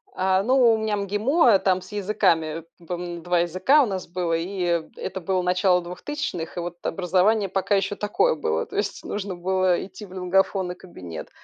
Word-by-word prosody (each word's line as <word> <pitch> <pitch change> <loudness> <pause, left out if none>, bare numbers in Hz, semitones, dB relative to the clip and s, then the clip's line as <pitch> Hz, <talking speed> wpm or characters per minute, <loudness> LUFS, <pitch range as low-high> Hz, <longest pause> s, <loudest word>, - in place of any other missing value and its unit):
А, 190 +1 +2
ну, 250 -1 +5
у - - +1
меня 220 -1 -1
МГИМО, 210 - +3
там 185 -1 +1
с 185 - -13
языками. 165 -6 0 0.2
По-моему, 175 -1 -5
2 175 0 +1
языка 185 - +3
у - - +2
нас 190 -4 -4
было, 175 -1 -2
и, 180 +3 -2
э, 170 -2 0
это 190 0 -5
было 185 +2 0
начало 180 0 +3
двухтысячных, 180 - -5
и - - 0
вот 175 0 -5
образование 195 +4 +2
пока 195 +2 +1
еще 195 +1 0
такое 210 - +1
было, 455 0 -1
то - - -11
есть - - -2
нужно 200 -2 -4
было 185 0 +1
идти 195 +2 -11
в 185 - -14
лингафонный 185 0 0
кабинет. 85 - -9
185 Hz, 185 wpm, -24 LUFS, 175-205 Hz, 0.2 s, ну